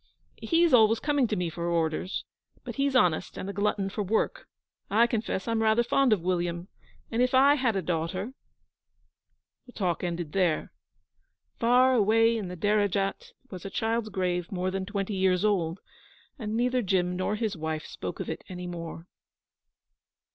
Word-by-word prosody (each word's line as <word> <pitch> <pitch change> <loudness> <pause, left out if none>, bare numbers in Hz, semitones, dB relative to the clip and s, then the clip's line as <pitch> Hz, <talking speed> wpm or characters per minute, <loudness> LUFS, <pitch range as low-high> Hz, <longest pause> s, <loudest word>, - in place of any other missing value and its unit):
He's 335 -2 +3
always 225 -1 +6
coming 290 -4 +1
to 215 - -1
me 180 -3 -1
for 170 +1 -4
orders; 165 +2 -1 0.4
but - - -7
he's 275 -1 +1
honest, 180 -8 +2
and - - -5
a 200 - -4
glutton 200 -1 0
for 200 +2 -4
work. 220 - -1 0.4
I 225 +3 +5
confess 220 -4 -2
I'm 230 -1 0
rather 220 +2 +3
fond 265 +1 +2
of 210 -5 +3
William, 175 0 -1 0.4
and 230 +1 +1
if 250 +1 +2
I 275 +2 +6
had 255 -7 +1
a 190 - -1
daughter 180 +7 -2 0.7
' - - -50
The 245 - -14
talk 180 -4 -1
ended 170 -3 -3
there. 180 -4 0 0.9
Far 250 +2 +4
away 225 0 +4
in 215 -4 -3
the 180 0 -7
Derajat 205 - 0 0.2
was 185 -3 -8
a 195 - -5
child's 225 +2 -1
grave 180 -3 -2
more 185 -1 -1
than 190 0 -3
twenty 200 0 -3
years 190 0 +2
old, 180 -4 0 0.6
and 220 -1 -3
neither 250 +1 +1
Jim 180 -3 0
nor 185 +3 -1
his 215 -2 -2
wife 160 -1 -4
spoke - - -6
of - - -4
it - - -5
any 180 -1 -6
more. 170 -1 -7
200 Hz, 170 wpm, -28 LUFS, 180-230 Hz, 0.9 s, always